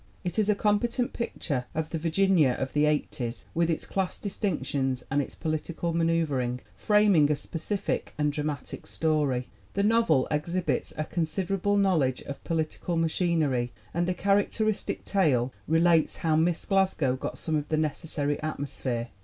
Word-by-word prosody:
It 180 +4 -2
is 215 -1 +2
a 210 - +4
competent 230 +4 +1
picture 145 - -3
of 160 0 -2
the 165 - -2
Virginia 165 -4 +3
of 130 +1 -4
the 150 0 +3
'8os 135 -5 -1
with 170 0 +1
its 165 - 0
class 190 -2 -1
distinctions 140 - -2
and 145 +1 +3
its 135 - -6
political 165 +1 -2
ma 165 0 +1
neuvering, 140 -7 0
framing 205 -8 +4
a - - +3
specific 170 +7 -3
and 150 -1 +1
dramatic 150 -1 -4
story. 145 -6 0 0.3
The 200 - +2
novel 210 - +3
exhibits 170 +4 -1
a 155 - 0
considerable 185 +5 0
knowledge 160 -11 +2
of 140 - -8
political 165 +1 -2
machinery 160 -7 +1 0.2
and 175 +1 0
a 180 - 0
characteristic 205 +2 0
tale 135 - +2
relates 165 0 +3
how 160 -1 +3
Miss 165 +1 +1
Glasgow 190 -9 +2
got 130 - -5
some 160 - -1
of 150 -1 -1
the 155 - 0
necessary 150 -1 -1
"atmosphere." 135 -6 -3
160 Hz, 155 wpm, -28 LUFS, 145-185 Hz, 0.3 s, a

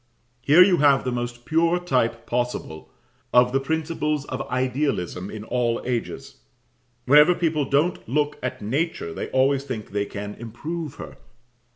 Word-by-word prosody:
Here 155 +8 +7
you 185 -2 +3
have 140 -2 +4
the 125 - -2
most 120 0 -4
pure 165 +2 +2
type 120 -9 0
possible 120 -10 -3 0.4
of 125 0 +5
the 135 - +2
principles 150 0 -2
of 130 -1 -4
idealism 125 - -1
in 110 -1 -7
all 120 0 0
ages: 120 -2 -4 0.7
whenever 150 +6 +6
people 155 -4 0
don't 145 +1 0
look 150 +2 0
at 130 -4 -4
Nature, 135 - -2
they - - -5
always 135 +1 +2
think 125 -7 -6
they 100 0 -1
can 105 0 -6
improve 150 +7 -6
her. - - -10
130 Hz, 150 wpm, -24 LUFS, 120-150 Hz, 0.7 s, Here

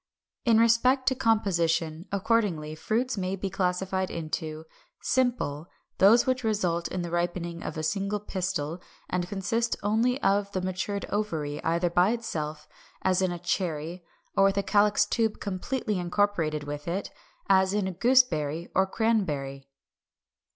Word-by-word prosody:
348. 230 -2 +5
In - - +6
respect 240 +3 +4
to - - 0
composition, 170 -8 +1
accordingly, 195 -7 0
fruits 220 +9 -1
may 185 +1 -1
be 195 0 -4
classified 190 0 -1
into 155 -1 -4 0.4
Simple, 235 - 0 0.3
those 215 +5 +6
which 255 -1 0
result 180 -6 0
from 180 - -2
the 170 - -5
ripening 170 0 -2
of - - -5
a 155 - -3
single 195 +6 -1
pistil, 180 -5 -3 0.3
and 180 -1 -1
consist 225 +4 -1
only 230 +5 +2
of 200 0 +2
the 185 - -1
matured 185 +2 -2
ovary, 160 -9 -2
either 170 +1 +1
by 180 +3 +4
itself, 155 -10 -3 0.4
as 185 0 +2
in 185 -1 +1
a 175 - -3
cherry, 175 -1 -2 0.3
or 195 - +5
with 195 0 +2
calyx 205 0 +4
tube 220 0 0
completely 205 +2 -2
incorporated 175 -4 0
with 145 +1 -6
it, 185 +4 -3 0.4
as 190 -1 +4
in 205 -1 0
a - - -2
gooseberry 180 - +2
or 190 +1 +3
cranberry. 150 -12 -1
190 Hz, 145 wpm, -27 LUFS, 170-210 Hz, 0.4 s, In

